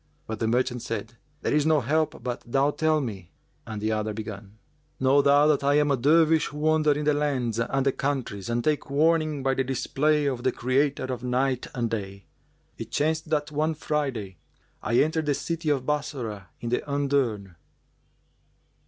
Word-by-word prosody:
But 110 -1 -5
the 115 - 0
merchant 125 +1 0
said, 115 +1 -5 0.3
"There - - 0
is 150 0 +3
no 155 0 +3
help 155 +5 -1
but 125 -1 -3
thou 135 +4 +1
tell 155 +1 +1
me;" 100 -9 -6 0.4
and 110 -2 -5
the 110 +1 -1
other 110 -1 -2
began, 105 -1 -8 0.4
"Know 135 +2 +4
thou 145 +1 +5
that 150 -2 +3
I 140 +1 +3
am 150 -1 +3
a - - +4
Dervish 155 +4 +4
who 150 - -9
wander 155 0 +3
in 150 +1 -3
the 150 - +4
lands 130 -6 -1
and 135 +3 0
the 135 - +4
countries, 130 -8 -3
and 120 0 0
take 150 0 0
warning 155 0 +2
by 135 0 +2
the 135 - 0
display[FN#395] 140 +2 +1
of 120 -1 -8
the 130 - +2
Creator 135 +3 0
of 130 -2 -4
Night 130 +1 0
and 120 -2 -1
Day. 100 -3 -5 0.5
It - - -6
chanced 155 +1 -1
that 150 -1 0
one 155 +2 0
Friday 135 - -3 0.4
I 120 - 0
entered 155 0 +2
the 145 - +2
city 165 0 -3
of 135 -3 0
Bassorah 125 - -3
in 120 - -4
the 125 - +1
undurn." 135 -9 0
135 Hz, 185 wpm, -26 LUFS, 115-150 Hz, 0.5 s, thou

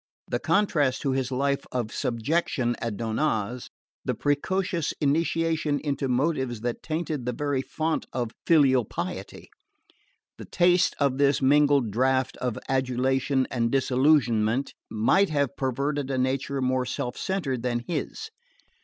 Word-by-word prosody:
The - - -1
contrast 150 -10 +1
to 135 - +1
his 130 -1 -1
life 140 +2 0
of 120 -3 -3
subjection 120 0 0
at 115 -3 -3
Donnaz; 115 0 -1 0.3
the - - -1
precocious 170 +3 -1
initiation 160 0 +1
into 140 -2 -2
motives 130 -3 0
that 120 0 -3
tainted 155 -5 -3
the 125 - 0
very 145 +1 -1
fount 160 +4 -2
of 120 -3 -2 0.2
filial 135 -6 +5
piety; - - -6 0.9
the - - -7
taste 175 0 +3
of 140 -2 +1
this 140 0 +3
mingled 140 -3 +3
draught 130 +3 +1
of 125 -3 -2
adulation 130 +1 +1
and 115 -2 0
disillusionment, 130 -3 +2 0.2
might 115 - +3
have 140 -3 0
perverted 140 +2 -1
a 135 - -1
nature 130 +1 -1
more 130 0 0
self 125 -1 -3
centred 155 -11 -2
than 120 -1 -1
his. 435 - -4
135 Hz, 135 wpm, -26 LUFS, 125-150 Hz, 0.9 s, filial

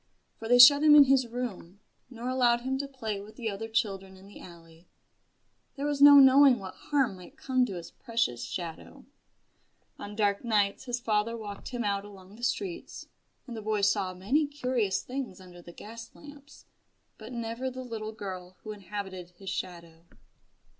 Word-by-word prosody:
For 225 - -6
they 245 +1 +5
shut 280 +4 +9
him 300 -1 +7
in 295 - +10
his 265 -2 +2
room, 225 -6 -6 0.3
nor 240 -1 -7
allowed 245 -2 +2
him 260 +2 -2
to 280 - -3
play 225 -7 -5
with 210 +2 -13
the 230 -4 -3
other 210 +3 -6
children 195 -4 -2
in 190 - -16
the 200 - -14
alley 165 -1 -15 0.9
there 280 0 -4
was 290 -1 -2
no 285 0 +10
knowing 270 -1 +7
what 190 -3 -8
harm 270 -9 -1
might 220 - -14
come 255 -4 +1
to 195 - -6
his 170 -1 -8
precious 230 - -2
shadow. 170 -3 -7 0.9
On 205 0 -8
dark 205 -1 0
nights 210 -1 0
his 245 -1 -3
father 225 0 -1
walked 205 -2 -8
him 245 -2 -4
out 200 -1 -1
along 195 -1 -14
the 235 - -15
streets; 345 +9 -4 0.4
and 240 - -8
the 220 - -6
boy 215 -1 -1
saw 195 -2 +1
many 265 +12 0
curious 250 -8 -1
things 250 -8 -6
under 180 -1 -14
the 175 - -12
gas 230 +5 -10
lamps, 290 -1 -15 0.5
but 220 +2 -10
never 235 +2 -4
the 255 0 -7
little 220 -3 -6
girl 185 -4 -8
who 215 - -6
inhabited 195 -3 -7
his 195 0 -7
shadow. 170 -3 -7
220 Hz, 180 wpm, -28 LUFS, 195-255 Hz, 0.9 s, in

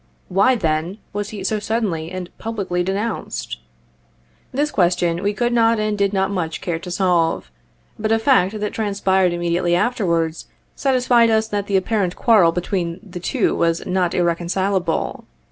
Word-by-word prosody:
Why, 200 +8 +4
then, 165 -1 -1 0.2
was 205 0 -3
he 205 -3 -7
so 215 +2 0
suddenly 205 -7 -2
and 185 -1 -7
publicly 200 -6 -2
denounced? 195 - -3 0.9
This 295 +3 0
question 175 -2 +1
we 200 +1 +1
could 240 +3 -1
not 230 -1 +3
and 215 0 0
did 200 -1 +1
not 195 -1 0
much 165 -5 -2
care 170 -2 -3
to 180 - -8
solve; 175 - +1 0.5
but 215 +1 -1
a 225 - +4
fact 220 -4 +2
that 210 0 -3
transpired 195 -3 +1
immediately 175 0 0
afterwards, 170 -7 0 0.3
satisfied 250 -3 +3
us 220 0 +2
that 205 -1 -2
the 200 - +2
apparent 190 -2 0
quarrel 210 -8 +5
between 175 0 -2
the 180 -1 -7
two 175 - 0
was 165 0 0
not 180 -2 0
irreconcileable. 175 +1 0
190 Hz, 155 wpm, -20 LUFS, 175-215 Hz, 0.9 s, quarrel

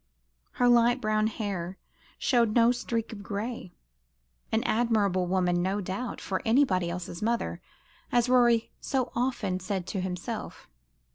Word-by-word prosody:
Her 245 - +2
light 240 +1 +5
brown 215 -2 +1
hair 195 -5 -4 0.4
showed 235 -5 +2
no 235 0 +6
streak 230 -2 -3
of 205 - -8
gray. 205 -1 -5 0.8
An 220 - +1
admirable 210 -6 +1
woman, 180 -1 +1
no 190 +3 0
doubt, 200 +6 -4
for 190 -1 -3
anybody 220 -8 +3
else's 175 0 -5
mother, 230 +2 -1 0.5
as 240 0 +3
Rorie 240 -2 +4
so 265 -3 -1
often 240 -7 -1
said 185 -1 -3
to 190 0 -3
himself. 185 +5 -5
215 Hz, 135 wpm, -28 LUFS, 185-240 Hz, 0.8 s, no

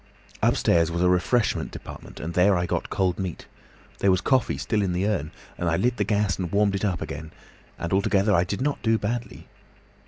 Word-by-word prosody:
"Upstairs 85 -1 +3
was 85 +1 -1
a 90 - +4
refreshment 95 +6 +1
department, - - -10
and 85 +3 -5
there 90 +2 +4
I 90 - 0
got - - -2
cold 95 -1 0
meat. 95 -4 -4 0.5
There 100 - +3
was 95 -1 +4
coffee 130 +4 +1
still 110 -2 0
in 95 -3 0
the 90 +2 0
urn, 85 -8 -1 0.3
and 90 - 0
I 80 - +2
lit 120 +5 +1
the 105 - +1
gas 100 -1 0
and 90 -3 -3
warmed 100 0 +2
it 100 - -2
up 95 -5 0
again, 80 +2 -7 0.5
and 85 +2 -3
altogether 100 +1 +2
I 85 -2 +4
did 100 +5 -4
not 145 +1 -1
do 115 0 +2
badly. 115 +3 -4
95 Hz, 210 wpm, -25 LUFS, 90-105 Hz, 0.5 s, a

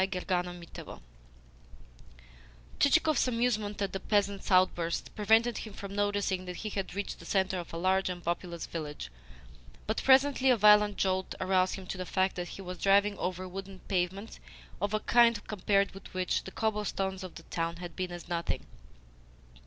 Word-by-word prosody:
CHAPTER 185 -1 0 0.4
VI - - -10 1.8
Chichikov's 310 0 +4
amusement 230 -4 0
at 195 - -3
the 195 - -2
peasant's 200 0 0
outburst 185 -3 +2
prevented 225 +3 +3
him 215 - -8
from 200 0 -7
noticing 205 -2 0
that 180 0 -6
he 215 - -4
had 195 -2 -4
reached 205 0 -4
the - - -12
centre 190 -1 +1
of 175 - -8
a 165 - -5
large 190 +2 +2
and 175 -1 -5
populous 170 -1 -3
village; 150 -3 -6 0.7
but, - - -1
presently, 270 0 +5
a 250 - +5
violent 210 -1 +6
jolt 190 -1 0
aroused 185 0 +2
him 190 - -8
to 185 - -5
the 185 - -4
fact 190 +1 +1
that 175 -1 -4
he 195 - -8
was 180 -1 -7
driving 200 +1 +4
over 185 +1 -3
wooden 195 +1 -7
pavements 190 +3 -2 0.4
of 205 +1 0
a 215 - -1
kind 235 -3 +4
compared 200 -1 +1
with 195 +1 -12
which 185 -1 0
the 190 - -7
cobblestones 205 -3 -2
of 185 - -8
the 165 - -10
town 165 0 -3
had 175 0 -8
been 185 -1 -3
as 175 -1 -8
nothing. 170 -1 -2
195 Hz, 170 wpm, -30 LUFS, 180-210 Hz, 1.8 s, violent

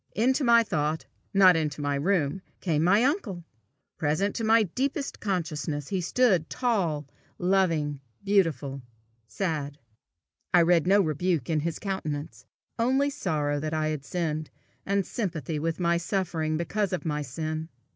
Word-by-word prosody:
Into 260 +6 +2
my 235 -2 +6
thought, 155 -6 -1 0.3
not 190 -2 +7
into 150 -2 -1
the 145 -1 -1
room, 180 -1 +1 0.2
came 160 -4 0
my 200 +6 +4
uncle! 250 - -1 0.6
Present 160 +6 +1
to 230 - -2
my 225 +1 +5
deepest 270 - -2
consciousness, 155 -7 -2
he 190 -2 -1
stood 185 -3 +2
tall, 185 - 0 0.3
loving, 165 -6 +1 0.2
beautiful, 155 -9 +1 0.5
sad. 150 - -3 0.8
I 175 - +7
read 170 0 +3
no 200 +2 +6
rebuke 165 -2 0
in 155 - +2
his 165 +2 -2
countenance, 155 -6 -4 0.3
only 265 +4 +2
sorrow 150 - -1
that 155 +2 -3
I 155 0 0
had 155 -3 -3
sinned, 155 -1 -2 0.4
and 200 -1 +1
sympathy 165 - -3
with 165 +2 -2
my 170 -1 +2
suffering 170 -3 -1
because 195 +4 -1
of 175 -5 -3
my 150 -2 -1
sin. 155 +4 -4
170 Hz, 145 wpm, -27 LUFS, 150-200 Hz, 0.8 s, not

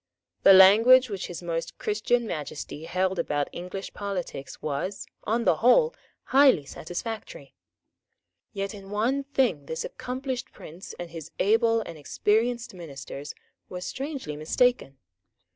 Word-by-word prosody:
The 195 - +8
language 225 +6 +7
which 195 -2 -4
His 175 0 -7
Most 165 -1 -4
Christian 225 +3 0
Majesty 150 -3 -6
held 185 +1 0
about 145 -3 -1
English 180 +3 -7
politics 180 -9 -5
was, 155 +7 -3 0.2
on 230 +3 +1
the 160 - +4
whole, 465 - +4 0.3
highly 265 - +5
satisfactory. 225 - -7 1.0
Yet 200 0 -4
in 195 -2 -11
one 245 +7 0
thing 250 - 0
this 160 - -3
accomplished 255 0 -5
prince 170 +5 -11
and 175 -1 -7
his 160 -2 -8
able 225 +3 +3
and 165 -7 -8
experienced 225 - 0
ministers 145 -4 -8 0.3
were 180 - -5
strangely 265 - -5
mistaken. 155 - +1
195 Hz, 125 wpm, -26 LUFS, 165-240 Hz, 1.0 s, The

